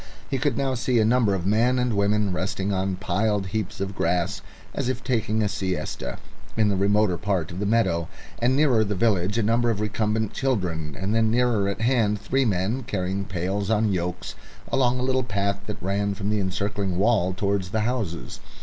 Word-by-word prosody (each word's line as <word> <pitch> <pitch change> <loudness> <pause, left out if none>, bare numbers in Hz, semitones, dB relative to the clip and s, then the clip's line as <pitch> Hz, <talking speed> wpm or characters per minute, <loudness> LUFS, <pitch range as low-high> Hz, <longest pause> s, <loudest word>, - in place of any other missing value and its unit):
He 135 - 0
could 140 -2 0
now 135 -1 0
see 125 0 0
a 110 - +4
number 115 -3 +3
of 90 -2 -3
men 115 +5 +3
and 125 -2 +1
women 100 -1 +1
resting 95 +2 -2
on 95 0 0
piled 100 +2 0
heaps 105 0 -3
of 95 +1 -3
grass, 90 +3 0 0.3
as 125 - -1
if 130 0 -3
taking 110 -3 0
a - - +2
siesta, 95 -10 -3 0.4
in 110 -2 +4
the 100 - +1
remoter 100 -2 +2
part 95 -4 -1
of 85 - -6
the 100 - -1
meadow, 95 -7 +2 0.3
and 125 +3 +2
nearer 135 -6 +4
the 105 -1 -2
village 100 0 +1
a 115 - +2
number 115 +2 +2
of 110 -3 0
recumbent 105 0 -1
children, 90 - -2
and 95 +3 -1
then 110 0 +3
nearer 115 -4 +2
at 100 - -4
hand 115 -4 +2
three 130 +6 +1
men 105 +4 0
carrying 100 -3 -2
pails 95 +2 -2
on 110 -2 +2
yokes 90 0 -3 0.4
along 125 -2 +2
a - - -1
little 130 0 +1
path 100 -2 -1
that 105 - -4
ran 100 +1 0
from 100 +1 -2
the 105 - +1
encircling 100 0 -2
wall 100 -3 +3
towards 100 -1 -1
the 110 +3 0
houses. 110 -7 -3
105 Hz, 195 wpm, -25 LUFS, 95-115 Hz, 0.4 s, a